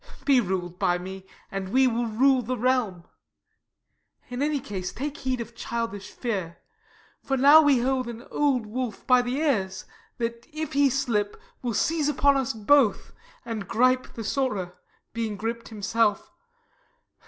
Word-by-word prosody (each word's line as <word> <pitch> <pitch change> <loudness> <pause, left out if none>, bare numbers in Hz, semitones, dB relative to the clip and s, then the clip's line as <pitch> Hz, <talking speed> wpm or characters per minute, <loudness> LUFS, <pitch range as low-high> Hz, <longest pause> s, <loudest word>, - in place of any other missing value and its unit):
Be 275 -3 +5
rul'd 180 -3 -3
by 175 0 +2
me, 190 +1 -8 0.2
and 195 -1 -4
we 260 +5 +4
will 240 -1 +1
rule 260 +4 +3
the 250 +2 -3
realm: 240 -8 0 1.3
In 250 +1 -4
any 295 0 +1
case 190 -6 -5
take 285 +3 -5
heed 260 -1 -2
of 230 0 -7
childish 230 -5 -4
fear, 190 -9 -4 0.6
For 270 - -1
now 285 +4 +8
we 285 -5 +4
hold 255 0 0
an 235 0 -7
old 275 -6 +1
wolf 235 0 -4
by 250 -1 +5
the 245 +1 -2
ears, 210 -11 0 0.3
That, 235 -1 -4
if 310 -1 -5
he 280 0 +4
slip, 235 -6 -1 0.2
will 240 -3 -2
seize 310 +2 +1
upon 280 0 +3
us 265 -3 0
both, 225 +2 +2 0.3
And 220 -4 -5
gripe 255 +2 +2
the 225 - -5
sorer, 210 -7 -2 0.4
being 225 -2 -2
grip'd 230 +2 -4
himself. 225 - 0
235 Hz, 155 wpm, -26 LUFS, 210-265 Hz, 1.3 s, now